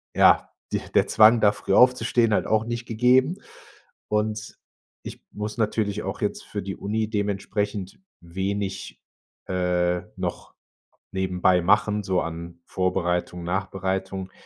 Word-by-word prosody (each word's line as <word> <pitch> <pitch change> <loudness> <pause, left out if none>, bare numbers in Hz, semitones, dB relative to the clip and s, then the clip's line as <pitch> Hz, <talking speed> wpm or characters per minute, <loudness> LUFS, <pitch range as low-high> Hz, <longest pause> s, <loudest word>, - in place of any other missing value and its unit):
ja, - - +5 0.2
die - - 0 0.2
der - - +4
Zwang, 110 +1 +6
da 105 -1 +6
früh 100 - -3
aufzustehen, 120 -2 +4
halt - - +1
auch 110 0 +2
nicht 120 0 -4
gegeben. 130 - +3 0.7
Und, 105 0 -2 0.5
ich - - -9
muss 105 +2 -5
natürlich 105 -2 -1
auch 95 +1 -4
jetzt 105 - -2
für 105 - -5
die 95 0 -5
Uni 110 +2 -2
dementsprechend 100 - -2 0.2
wenig, 95 +3 -4 0.5
äh, 90 -1 0 0.2
noch - - -5 0.6
nebenbei 90 -1 +2
machen 105 +4 +2
so 95 -2 0
an 85 +1 -6
Vorbereitung, 90 -1 -1
Nachbereitung, 95 +1 -3
100 Hz, 125 wpm, -24 LUFS, 95-110 Hz, 0.7 s, Zwang